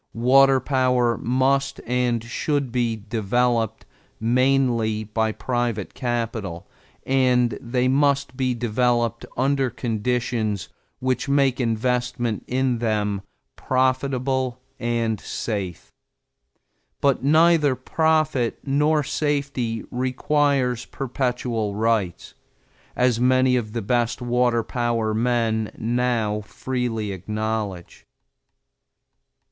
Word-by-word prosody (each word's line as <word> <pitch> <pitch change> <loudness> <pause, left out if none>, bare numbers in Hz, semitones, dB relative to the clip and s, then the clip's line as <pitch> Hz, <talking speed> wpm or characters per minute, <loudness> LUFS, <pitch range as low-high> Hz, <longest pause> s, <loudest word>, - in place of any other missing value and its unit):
Water 135 +3 +5
powers 125 -3 +1
must 135 +3 +1
and 120 -1 0
should 140 +2 -2
be 120 -2 0
developed 115 +2 -1 0.3
mainly 120 -2 +2
by 110 +1 -1
private 120 -3 -2
capital 115 -8 -3 0.4
and 125 -2 +3
they 125 0 0
must 140 0 +2
be 130 -1 0
developed 120 0 0
under 135 0 +1
conditions 115 -2 -2 0.3
which 130 +1 -1
make 140 -2 +2
investment 120 0 -1
in 125 -1 0
them 105 -3 0 0.3
profitable 130 -1 0 0.2
and 115 -3 -1
safe. 100 -6 -4 1.1
But 140 -2 +2
neither 155 -1 +4
profit 155 -2 +1
nor 150 +2 +2
safety 140 -6 -1
requires 130 -1 +1
perpetual 125 -5 -2
rights, 110 -5 -1 0.6
as 125 -2 +2
many 130 +1 +4
of 110 -4 -2
the 115 -2 -3
best 120 +2 0
water 120 -1 +1
power 115 -3 -1
men 115 -1 0
now 115 -2 0
freely 115 -1 -3
acknowledge. 105 -1 -4
125 Hz, 90 wpm, -23 LUFS, 115-130 Hz, 1.1 s, Water